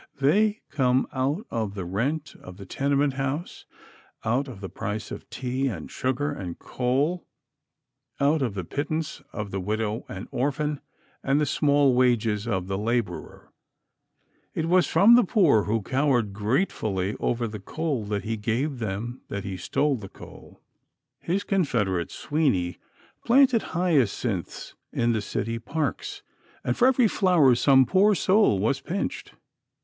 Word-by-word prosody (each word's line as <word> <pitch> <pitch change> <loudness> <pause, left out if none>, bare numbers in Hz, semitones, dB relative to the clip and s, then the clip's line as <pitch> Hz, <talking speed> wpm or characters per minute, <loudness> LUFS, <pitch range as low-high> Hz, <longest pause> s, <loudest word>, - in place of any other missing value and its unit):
They 205 +10 +3
come 130 -2 +2
out 140 - -1
of 110 -3 -2
the 95 -3 -4
rent 135 - -2
of 90 0 -11
the 100 - -9
tenement 140 +6 +1
house; 135 +5 -4 0.6
out 125 +6 +1
of 120 -7 -9
the 95 - -6
price 100 +4 -5
of - - -8
tea 130 +2 -2
and 90 - -5
sugar 130 +3 -1
and 95 -11 -6
coal; 140 +8 -1 0.9
out 145 +2 +3
of 120 -6 -1
the 95 - -3
pittance 155 - -3
of 105 -2 -5
the 95 - -2
widow 110 +3 -2
and 95 0 -7
orphan, 145 +2 -1 0.4
and 135 +2 +2
the 150 - +2
small 145 -1 +3
wages 115 -4 +2
of 95 -5 -1
the 95 +1 -3
laborer. 115 +1 -3 1.0
It 160 - -1
was 180 +2 +3
from 215 +5 +6
the 245 0 +7
poor 175 - +3
who 110 0 0
cowered 130 -5 +1
gratefully 105 - -1
over 120 -1 0
the 105 -1 -7
coal 145 +3 -3
that 105 -1 -2
he 115 0 -2
gave 120 +6 -1
them 110 +3 -4
that 100 -1 -4
he 95 -1 -4
stole 135 +10 0
the 100 -4 -9
coal. - - -14 0.6
His 190 +4 -1
confederate, 105 - 0
Sweeny, 130 - -1 0.4
planted 255 -2 +5 0.2
hyacinths 125 - 0 0.2
in 120 0 +1
the 110 - 0
city 115 +3 -3
parks, 400 - -3 0.4
and - - 0
for 250 - +4
every 255 -3 +4
flower 180 -11 +4
some 130 +2 +5
poor 195 - +4
soul 190 - +3
was 110 +8 0
pinched. 195 +4 -4
130 Hz, 150 wpm, -26 LUFS, 105-155 Hz, 1.0 s, the